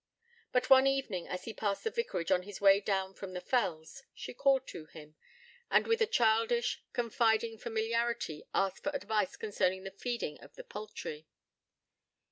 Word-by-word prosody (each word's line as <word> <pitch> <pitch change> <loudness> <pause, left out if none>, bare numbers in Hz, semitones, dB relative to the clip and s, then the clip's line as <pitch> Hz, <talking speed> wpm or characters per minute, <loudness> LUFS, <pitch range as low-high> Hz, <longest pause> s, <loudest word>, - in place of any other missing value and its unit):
But 250 - +2
one 265 0 +8
evening, 265 -10 -1
as 180 0 -4
he 225 - -6
passed 205 -2 -2
the 450 - -1
vicarage 310 - -2
on 180 -1 +4
his 195 +1 -9
way 195 0 +7
down 195 -2 -1
from 190 -1 -8
the 180 - -3
fells, 180 +1 -1
she - - -7
called 265 +1 +3
to 155 - -8
him, 155 -1 -13 0.6
and - - +4
with 455 0 +1
a 450 - +4
childish, 230 - +2
confiding 225 -1 +1
familiarity 230 -7 -1
asked 195 -1 0
for 295 -1 -2
advice 215 -7 0
concerning 190 -3 0
the 195 - -6
feeding 235 -8 -3
of - - -15
the - - -9
poultry. 180 -7 -7
215 Hz, 165 wpm, -32 LUFS, 190-240 Hz, 0.6 s, one